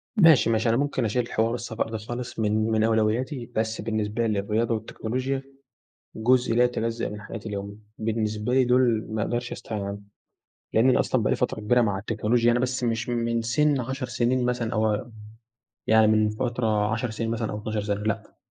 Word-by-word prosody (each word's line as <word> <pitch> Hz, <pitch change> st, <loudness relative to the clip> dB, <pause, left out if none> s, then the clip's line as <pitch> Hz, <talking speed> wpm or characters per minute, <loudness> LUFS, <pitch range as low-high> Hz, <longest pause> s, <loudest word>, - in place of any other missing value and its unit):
ماشي، 165 Hz, -, +6 dB
ماشي، 115 Hz, +1 st, +2 dB
أنا 115 Hz, -, +3 dB
ممكن 140 Hz, -4 st, 0 dB
اشيل 120 Hz, +3 st, -1 dB
حوار 115 Hz, +1 st, +1 dB
السفر 115 Hz, -2 st, -3 dB
ده 110 Hz, -, -3 dB
خالص 120 Hz, +2 st, -6 dB
من 110 Hz, +1 st, +1 dB
من 110 Hz, 0 st, +2 dB
أولوياتي، 115 Hz, +4 st, +1 dB
بس 110 Hz, 0 st, -1 dB
بالنسبة 110 Hz, +1 st, -1 dB
الرياضة 110 Hz, +2 st, 0 dB
والتكنولوجيا 130 Hz, +5 st, -3 dB, 0.7 s
جزء 125 Hz, +1 st, +2 dB
لا 120 Hz, -, +5 dB
يتجزأ 115 Hz, -1 st, -1 dB
من 105 Hz, 0 st, -7 dB
حياتي 110 Hz, 0 st, -7 dB
اليومية، 100 Hz, 0 st, -5 dB, 0.2 s
بالنسبة 110 Hz, +1 st, -1 dB
لي 130 Hz, 0 st, +5 dB
دوُل 125 Hz, -3 st, +3 dB
ما 110 Hz, -1 st, -2 dB
اقدرش 120 Hz, +2 st, -2 dB
استغنى 110 Hz, -3 st, -5 dB
عنهم، 100 Hz, 0 st, -7 dB, 0.7 s
لإن 115 Hz, +4 st, +5 dB
أنا -, -, +4 dB
أصلًا -, -, +1 dB
بقى -, -, 0 dB
لي -, -, +3 dB
فترة -, -, -1 dB
كبيرة 120 Hz, +4 st, +3 dB
مع 100 Hz, -4 st, +1 dB
التكنولوجيا 115 Hz, +2 st, +1 dB
أنا 120 Hz, -, +2 dB
بس 125 Hz, 0 st, -1 dB
مش 115 Hz, +1 st, -1 dB
من 115 Hz, -1 st, 0 dB
سِن 140 Hz, +3 st, +2 dB
10 130 Hz, +2 st, -4 dB
سنين 125 Hz, +1 st, +1 dB
مثلًا 120 Hz, -2 st, -1 dB
أو 110 Hz, -1 st, +2 dB
ام 115 Hz, +3 st, -4 dB, 0.8 s
يعني 110 Hz, 0 st, +5 dB
من 110 Hz, 0 st, +3 dB
فترة 110 Hz, -2 st, 0 dB
10 115 Hz, +1 st, -1 dB
سنين 115 Hz, +1 st, -3 dB
مثلًا 115 Hz, -1 st, -2 dB
أو 105 Hz, -, -4 dB
12 110 Hz, 0 st, -3 dB
سَنة، 105 Hz, 0 st, -2 dB
لأ، 110 Hz, -1 st, -3 dB
115 Hz, 190 wpm, -25 LUFS, 110-120 Hz, 0.8 s, ماشي